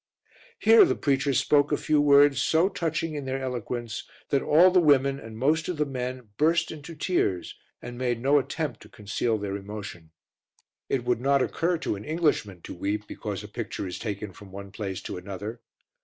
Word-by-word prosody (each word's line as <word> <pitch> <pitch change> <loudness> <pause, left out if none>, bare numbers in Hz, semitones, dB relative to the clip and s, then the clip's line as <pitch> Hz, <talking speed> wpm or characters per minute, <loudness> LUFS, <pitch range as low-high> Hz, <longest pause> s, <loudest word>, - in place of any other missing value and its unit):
Here 455 -2 +7
the 365 - +2
preacher 140 0 +1
spoke 145 +3 +3
a 145 - +2
few 150 -1 +2
words 140 -1 +5
so 165 +4 +3
touching 165 -3 -2
in 145 -2 -5
their 135 0 -2
eloquence 120 -3 -4 0.2
that 140 - +2
all 175 +5 +5
the 180 - +5
women 140 -4 +3
and 110 -3 -10
most 155 +7 +1
of 180 - -2
the 150 - +1
men 125 -3 -5
burst 165 +3 +2
into 160 +1 -9
tears 150 - -1 0.3
and 120 0 -7
made 120 -2 0
no 140 +4 +4
attempt 140 -3 -4
to - - -14
conceal 110 +2 -2
their 100 -1 -4
emotion. 100 -5 -8 0.8
It 130 -3 0
would 120 -1 +1
not 140 0 +3
occur 170 +1 0
to 160 - -2
an 100 - -9
Englishman 150 - 0
to - - -7
weep 105 +4 -3
because - - -5
a - - -8
picture - - -5
is 90 - -5
taken 105 -3 -5
from 95 +2 -14
one 100 0 -9
place 100 -2 -5
to - - -5
another. 100 +5 -7
130 Hz, 190 wpm, -26 LUFS, 105-150 Hz, 0.8 s, Here